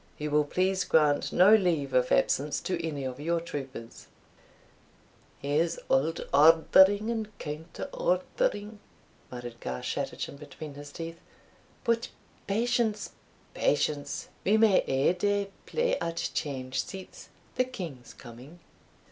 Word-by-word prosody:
You 150 0 -4
will 150 0 +3
please 185 +4 +1
grant 150 -2 +2
no 185 +4 +6
leave 170 -10 +2
of 125 0 +2
absence 145 +2 +2
to 185 - -2
any 150 -4 -3
of 130 0 -5
your 170 +3 0
troopers." 135 -8 -8 1.4
"Here's 150 +4 +1
auld 155 +5 +1
ordering 190 +8 +6
and 220 -2 -4
counter 155 +2 -6
ordering," - - -1 0.5
muttered 120 -1 -8
Garschattachin 65 - -4
between 150 +1 -9
his 145 0 -10
teeth. 165 +2 -7 0.6
"But 230 -2 +1 0.4
patience! 230 +1 0 0.4
patience! 150 - 0
we 210 +3 +4
may 215 -4 +5
ae 135 +5 +2
day 200 +2 0 0.2
play 485 +1 0
at 170 0 -2
change 130 -3 -2
seats, 190 -1 -10 0.2
the 255 - +1
king's 165 - -8
coming." 125 +7 -12
165 Hz, 120 wpm, -29 LUFS, 140-205 Hz, 1.4 s, no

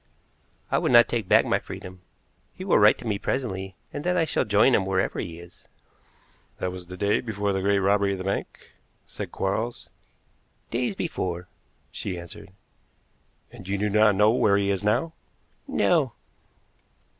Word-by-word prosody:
I - - +3
would - - 0
not 120 -1 +7
take 115 -5 -2
back - - +5
my - - +1
freedom. 90 0 -10 0.5
He - - -7
will - - +4
write - - +6
to - - -11
me 105 -3 -1
presently, 95 -8 -3 0.2
and 145 - -5
then 180 0 +1
I 165 - +3
shall 155 - 0
join 105 +5 +4
him 100 - +3
wherever 95 0 -1
he 85 -1 -5
is." 85 +1 -15 0.9
"That 90 - -2
was 90 -1 -9
before 100 +2 -1
the 95 - -1
great 100 +1 +2
robbery 100 0 +2
of - - -4
the 95 - -5
bank," 100 +1 -4 0.3
said - - -7
Quarles. 110 +5 -3 0.8
"Days 125 - -1
before," 90 - -4 0.4
she 95 -3 -5
answered. 85 +3 -10 1.0
"And 95 - -12
you 100 +1 -1
do 105 +1 0
not 105 -1 +4
know 105 +2 +5
where 105 -4 +3
he 100 0 +1
is 95 0 -2
now?" 160 +10 +1 0.5
"No." - - +2
100 Hz, 165 wpm, -25 LUFS, 95-110 Hz, 1.0 s, not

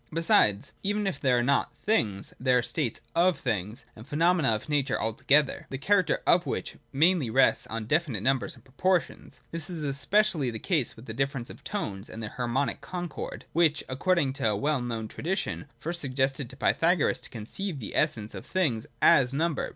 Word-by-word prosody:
Besides, 105 -11 +2
even 205 +1 -1
if 195 - -2
there 130 -3 +3
are 120 - +2
not 140 +1 +1
things, 105 - 0
there 125 0 +3
are 125 - +1
states 130 -3 -2
of 175 +1 +3
things, 110 -1 -3
and 110 +3 -12
phenomena 165 -1 +2
of 105 - -6
nature 145 -3 0
altogether, 135 +6 +2
the 135 - -4
character 190 +7 +2
of 170 -3 +4
which - - -3
mainly 160 -2 +3
rests 130 +4 +3
on 115 -1 -4
definite 140 - 0
numbers 135 +1 0
and - - -19
proportions. 140 -1 -1
This 165 -1 -3
is 165 -4 -4
especially 150 +2 +2
the 115 - -4
case 150 - 0
with 115 - -13
the 110 - -6
difference 135 0 -2
of - - -14
tones 105 - -4
and 115 - -7
their 110 - -5
harmonic 125 +3 -1
concord, 175 -4 -6
which, 160 -3 +3
according 140 +1 +1
to 125 - 0
a 105 - +1
well 145 +3 0
known 115 -2 -3
tradition, 180 - -3
first 170 +2 -2
suggested 135 -1 -1
to 130 - -11
Pythagoras 165 +2 +2
to - - -8
conceive 140 - -5
the 110 - -7
essence 115 -9 0
of - - -7
things 135 -8 -1 0.2
as 130 -1 +5
number. 160 +1 0
135 Hz, 185 wpm, -28 LUFS, 120-170 Hz, 0.2 s, as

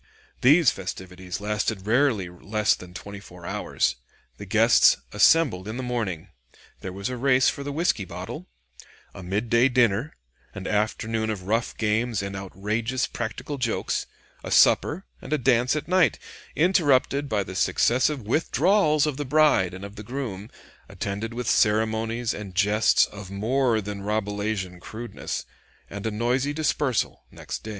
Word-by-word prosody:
These 150 +5 +6
festivities 90 -1 -7
lasted 105 -1 -2
rarely 115 -4 +2
less 105 +5 0
than 90 0 -10
twenty 100 +1 -8
four 90 -2 -13
hours. - - -1 0.4
The - - -9
guests - - +5
assembled 140 - +3
in 110 +2 -5
the 130 - -4
morning. 115 -10 -3 0.5
There 95 - -6
was 100 +5 -4
a 125 - -4
race 130 0 +4
for - - -5
the 145 - -4
whisky 150 - 0
bottle; 95 - -7 0.7
a - - -9
midday 115 +7 +2
dinner; 120 +2 +1 0.4
an 95 - -7
afternoon 110 +1 -1
of 105 -4 -4
rough 115 +5 -1
games 110 0 0
and 100 0 -5
outrageous 105 +6 -2
practical 120 +5 -5
jokes; 120 -3 -1 0.4
a - - -6
supper 175 +6 +4 0.2
and 150 -4 -2
dance 125 +2 +3
at 150 0 -3
night, 180 - +3 0.4
interrupted 145 -5 +2
by 105 -2 0
the 95 - -8
successive 130 +7 +1
withdrawals 155 - +2
of 150 -3 -2
the 145 - -2
bride 150 - +3
and 95 +2 -8
of 100 +1 -11
the 105 - -7
groom, 115 -4 -5 0.4
attended 100 +3 -4
with 125 -1 -4
ceremonies 110 +2 +1
and 100 -3 -8
jests 105 +3 +4
of 105 -2 -10
more 115 +4 +1
than 100 0 -6
Rabelaisian 105 -3 -2
crudeness; 115 +6 -6 0.5
and 100 +2 -4
a - - +1
noisy 125 +6 0
dispersal 145 -5 -1
next - - -7
day. 110 - -8
110 Hz, 150 wpm, -25 LUFS, 100-130 Hz, 0.7 s, These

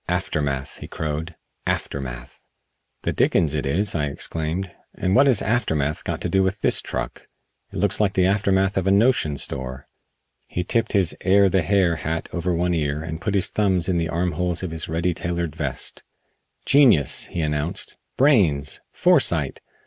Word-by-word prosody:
"Aftermath!" 75 -6 -2
he - - -8
crowed, 80 +2 -4 0.3
"aftermath!" - - -4 0.6
"The - - -1
dickens 75 -3 +2
it 75 -2 -1
is," 95 +9 0
I 75 -3 0
exclaimed, 80 +5 -2 0.2
"and 95 +1 0
what 140 +2 +6
has 125 -7 +3
aftermath 80 -11 0
got - - -4
to - - -1
do 95 - +2
with 95 0 -1
this - - +2
truck? - - -5 0.4
It - - -12
looks - - +2
like 100 -2 +2
the 90 - +3
aftermath 95 0 +1
of 95 0 0
a - - +4
notion 100 - +2
store." 65 0 -3 0.6
He 90 - -3
tipped 110 +4 0
his 95 -5 +2
"Air 100 +1 +4
the 95 0 +2
Hair" 90 -2 +2
hat 80 +2 -3
over 90 +1 -1
one 90 +1 0
ear 75 -2 -1
and 80 +1 -6
put 100 +1 -1
his 95 - +1
thumbs 95 -5 +1
in 90 -2 +1
the 85 0 -1
armholes 90 +1 -1
of 90 - -3
his 80 -1 -3
"ready 85 +2 0
tailored" 85 -2 -3
vest. 75 -5 -4 0.6
"Genius!" 120 - +4
he 85 - -4
announced. 75 +5 -2 0.2
"Brains! 90 - +3
Foresight! - - +3
85 Hz, 170 wpm, -23 LUFS, 75-95 Hz, 0.6 s, what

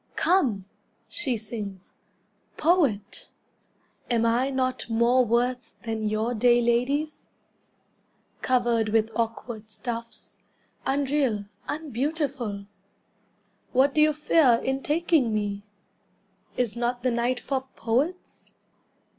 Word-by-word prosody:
"Come," 255 - +2 0.4
she 270 -9 -1
sings, 205 -3 -6 0.6
"Poet! 285 - +1 0.8
Am 230 -2 +2
I 240 +4 +2
not 255 -3 -1
more 235 +3 +4
worth 245 +2 0
than 220 -2 -2
your 220 +3 0
day 240 +1 +4
ladies, 250 +6 0 1.1
Covered 240 -3 +2
with 220 +1 +2
awkward 230 -1 -3
stuffs, 230 +1 -5 0.5
Unreal, 270 -6 +1 0.2
unbeautiful? 275 -7 -2 1.1
What 270 +2 +4
do 305 - +3
you 305 0 +6
fear 295 -5 +4
in 265 +1 -1
taking 300 -7 +2
me? 205 -1 -2 1.0
Is 240 -3 0
not 240 +1 -1
the 255 - +2
night 240 +1 0
for 265 +1 -3
poets? 275 +11 -2
245 Hz, 100 wpm, -26 LUFS, 225-275 Hz, 1.1 s, you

